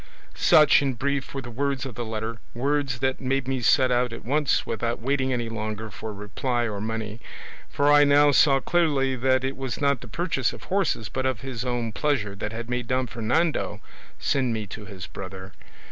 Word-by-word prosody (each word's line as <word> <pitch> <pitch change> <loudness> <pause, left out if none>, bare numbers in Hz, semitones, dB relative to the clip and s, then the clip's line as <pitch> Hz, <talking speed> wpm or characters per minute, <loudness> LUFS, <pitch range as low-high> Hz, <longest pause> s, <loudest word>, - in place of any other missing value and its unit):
"Such, 150 -2 +6
in 135 -3 0
brief, 140 +3 -2
were 135 - -3
the 120 - -8
words 135 +1 -1
of 130 - -6
the 120 - -4
letter, 110 +1 -4 0.2
words 135 -1 0
that 130 0 0
made 135 0 0
me 135 -1 -1
set 130 +1 +4
out 125 0 +2
at 115 - -8
once 145 +2 +1
without 115 +1 -2
waiting 130 +1 0
any 120 -2 -1
longer 110 -1 -4
for 110 +1 -6
reply 115 +4 -2
or 105 -2 -4
money; 110 0 -4 0.5
for 145 +1 +2
I 145 0 +7
now 145 0 +5
saw 135 -1 +5
clearly 140 -5 +1
that 130 +1 +2
it 135 +1 -2
was 135 -2 -4
not 140 -3 +1
the 125 - -9
purchase 165 +7 -1
of - - -11
horses 185 - 0
but 130 +5 -2
of 130 -5 -2
his 130 -3 -4
own 120 -3 -2
pleasure 110 -5 0
that 105 +2 -5
had 115 +1 -5
made 125 -1 -2
Don 130 +1 +1
Fernando 120 0 0 0.4
send 130 -4 0
me 110 -1 -3
to 105 +2 -9
his 95 -2 -8
brother. 95 +1 -8
125 Hz, 200 wpm, -25 LUFS, 110-140 Hz, 0.5 s, I